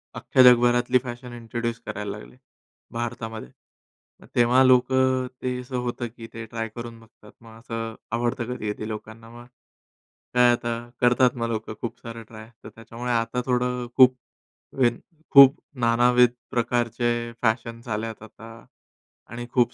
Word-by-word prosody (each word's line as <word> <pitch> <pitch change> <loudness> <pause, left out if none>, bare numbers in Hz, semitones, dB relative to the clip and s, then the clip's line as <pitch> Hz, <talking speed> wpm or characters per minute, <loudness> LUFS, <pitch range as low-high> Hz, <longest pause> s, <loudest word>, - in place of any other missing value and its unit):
अख्ख्या 130 - +3
जगभरातली 120 0 +5
fashion 120 0 -8
introduce 115 0 -4
करायला 105 0 -5
लागले - - -14 0.6
भारतामध्ये, 115 - -5 0.7
मग - - -16
तेव्हा 120 +2 +5
लोकं 130 0 +3
अ, - - -6
ते 125 0 -2
असं 125 0 -5
होतं, 120 -1 -3
की 115 -1 -9
ते 115 0 -7
ट्राय 115 0 -4
करून 115 -1 -8
बघतात, 110 -2 -19
मग 115 -1 -14
असं 115 -1 -5 0.2
आवडतं 120 +1 -1
कधी-कधी 105 -1 -4
लोकांना 110 +1 -8
मग 120 0 -12 0.9
काय 125 0 +5
आता 120 0 -2 0.3
करतात 125 +1 +4
मग 115 -1 -1
लोकं 110 -1 -4
खूप 120 - -5
सारं 115 0 -8
ट्राय, 110 0 -12
तर - - -9
त्याच्यामुळे 115 +2 -6
आता 115 +2 0
थोडं 125 0 0
अ, - - -9
खूप 130 -1 +7 0.6
वेन 120 -3 +2 0.3
खूप 140 0 +9 0.2
नानाविध 120 +1 +4 0.2
प्रकारचे 120 0 -1
फॅशन्स 115 0 -1
आलेत 110 0 -4
आता 115 +1 -13 0.6
आणि 120 0 -6
खूप 125 -2 +2
120 Hz, 145 wpm, -24 LUFS, 115-125 Hz, 0.9 s, खूप